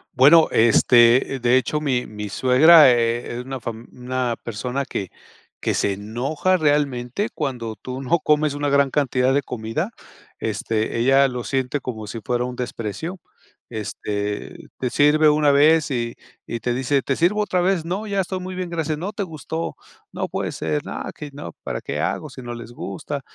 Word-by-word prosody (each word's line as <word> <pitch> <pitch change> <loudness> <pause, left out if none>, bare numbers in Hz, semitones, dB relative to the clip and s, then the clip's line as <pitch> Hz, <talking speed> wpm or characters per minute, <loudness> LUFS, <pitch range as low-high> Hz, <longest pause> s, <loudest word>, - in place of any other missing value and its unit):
Bueno, 155 +5 +7
este, 120 +3 +5
de 125 +1 +4
hecho, 150 +4 -1
mi 130 -4 0
mi 105 -1 -7
suegra 140 - +7
e 120 0 0
es - - -5
una 135 -1 -5
fam 115 +1 -7
una 125 -1 -2
persona 125 +4 -3
que 95 - -4 0.5
que - - -1
se 100 - +1
enoja 125 - -1
realmente 145 - 0
cuando 120 -7 -3
tú 130 +3 -7
no 170 +6 +2
comes 150 -1 +2
una 145 0 -1
gran 140 -1 +3
cantidad 130 -2 +1
de 140 - +2
comida, 125 - -3 0.5
este, 110 +1 -2
ella 135 +3 +5
lo 125 -1 -5
siente 135 +1 -1
como 110 -5 -6
si 115 +3 -6
fuera 120 +1 0
un 125 0 -4
desprecio. 125 - -5 0.5
Este, 105 -2 -4
te 125 - -2
sirve 150 +3 +5
una 150 -1 +3
vez, 150 +2 +4
y 120 -3 -2 0.3
y 120 - -4
te 120 +1 -1
dice: 135 +2 +1
"¿Te 135 - -1
sirvo 190 +6 +2
otra 185 -4 0
vez?", 185 -2 +1
"No, 190 +6 -3
ya 200 -2 -1
estoy 185 0 -4
muy 185 +1 -6
bien, 185 -1 -4
gracias". 160 -3 -2
"No 195 +5 -4
te 200 - -2
gustó, 160 -1 -5 0.4
no - - -3
puede - - -3
ser". 75 -2 -2
"No, - - -5
que 150 -2 -8
no, 85 - -8
¿para - - -4
qué - - -4
hago - - -2
si 130 - -10
no 120 - -5
les 120 0 -9
gusta?". 130 +6 -5
130 Hz, 180 wpm, -22 LUFS, 120-155 Hz, 0.5 s, Bueno